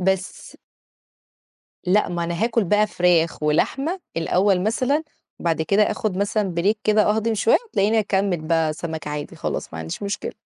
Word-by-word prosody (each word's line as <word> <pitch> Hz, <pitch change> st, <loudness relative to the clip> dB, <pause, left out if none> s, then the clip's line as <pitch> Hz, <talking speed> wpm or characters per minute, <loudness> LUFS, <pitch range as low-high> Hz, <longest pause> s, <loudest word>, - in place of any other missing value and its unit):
بس 190 Hz, +1 st, -2 dB, 1.3 s
لأ 195 Hz, +3 st, +2 dB
ما 175 Hz, -1 st, -2 dB
أنا 170 Hz, +5 st, -1 dB
هاكل 230 Hz, -2 st, +1 dB
بقى 210 Hz, +4 st, +3 dB
فراخ 175 Hz, -5 st, +1 dB
ولحمة 270 Hz, -, 0 dB, 0.2 s
الأول 185 Hz, +3 st, +2 dB
مثلًا، 255 Hz, +8 st, +1 dB, 0.4 s
بعد 165 Hz, -2 st, 0 dB
كده 200 Hz, +5 st, +3 dB
آخد 210 Hz, -2 st, -1 dB
مثلًا 200 Hz, -1 st, -1 dB
break 205 Hz, +5 st, +3 dB
كده 215 Hz, 0 st, +4 dB
اهضم 220 Hz, +1 st, 0 dB
شوية 220 Hz, -, +4 dB
وتلاقيني 215 Hz, -, +2 dB
أكمّل 195 Hz, -4 st, 0 dB
بقى 160 Hz, 0 st, +1 dB
سَمَك 160 Hz, -1 st, -6 dB
عادي 150 Hz, 0 st, -5 dB
خلاص -, -, -4 dB
ما 80 Hz, -, -7 dB
عنديش 80 Hz, -, -6 dB
مشكلة. 200 Hz, +1 st, -3 dB
195 Hz, 155 wpm, -22 LUFS, 170-215 Hz, 1.3 s, كده